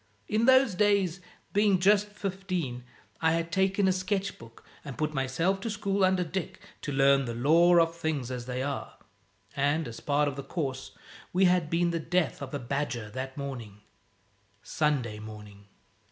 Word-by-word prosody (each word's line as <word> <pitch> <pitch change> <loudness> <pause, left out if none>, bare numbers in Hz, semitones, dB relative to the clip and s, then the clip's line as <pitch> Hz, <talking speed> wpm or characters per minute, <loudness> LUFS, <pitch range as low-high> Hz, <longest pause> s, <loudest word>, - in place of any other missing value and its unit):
In 220 +2 +1
those 260 -3 +5
days, 195 -2 +2 0.3
being 205 -1 +4
just 205 +3 +4
fifteen, 185 -10 -4 0.4
I 160 0 +3
had 165 0 -1
taken 190 +2 +2
a - - +4
sketch 190 +1 -2
book 115 0 -14 0.2
and 140 -3 -8
put 155 0 -1
myself 150 +8 0
to 230 - -3
school 200 -2 -1
under 185 -1 +3
Dick 170 +2 -5 0.2
to 145 - -4
learn 135 0 +4
the 115 -1 -4
lore 170 +8 +5
of 165 0 +2
Things 155 -7 -2
As 125 -1 -5
They 125 +1 -2
Are: 140 0 -4 0.6
and, 145 +3 +1
as 115 - -8
part 145 0 +1
of 140 -1 -3
the 140 - -5
course, 135 -6 -4 0.3
we 190 +2 +3
had 180 -3 +3
been 170 +1 +1
the 165 - -1
death 165 -2 0
of 135 -1 -6
a - - 0
badger 125 -4 -3
that 130 +2 -6
morning 120 -8 -6 0.8
Sunday 135 -9 -1
morning. 105 -2 -11
160 Hz, 170 wpm, -28 LUFS, 130-190 Hz, 0.8 s, those